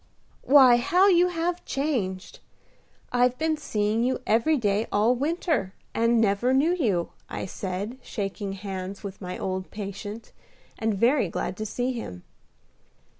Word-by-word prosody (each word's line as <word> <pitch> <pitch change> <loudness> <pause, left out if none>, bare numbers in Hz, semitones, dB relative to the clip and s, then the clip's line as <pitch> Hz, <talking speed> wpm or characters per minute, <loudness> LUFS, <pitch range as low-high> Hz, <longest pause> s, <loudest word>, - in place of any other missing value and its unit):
"Why, 260 -4 +7
how 365 +9 +4
you 355 -1 +5
have 350 0 -2
changed! 215 -10 -2 0.7
I've 245 0 +2
been 320 0 +1
seeing 220 -6 0
you 255 +1 +1
every 235 +8 +3
day 210 -2 0
all 215 +4 +3
winter, 295 - -1 0.2
and 230 0 +3
never 225 +4 +2
knew 310 +6 +3
you," 210 - 0 0.2
I - - -4
said, 195 +6 -5
shaking 200 -3 -4
hands 195 0 -6
with 200 -1 -7
my 180 -1 -5
old 185 0 -3
patient, 205 +2 -7 0.5
and 220 -1 0
very 235 - +3
glad 180 - -3
to 215 - -3
see 245 +4 -2
him. 90 - -7
225 Hz, 140 wpm, -26 LUFS, 200-270 Hz, 0.7 s, Why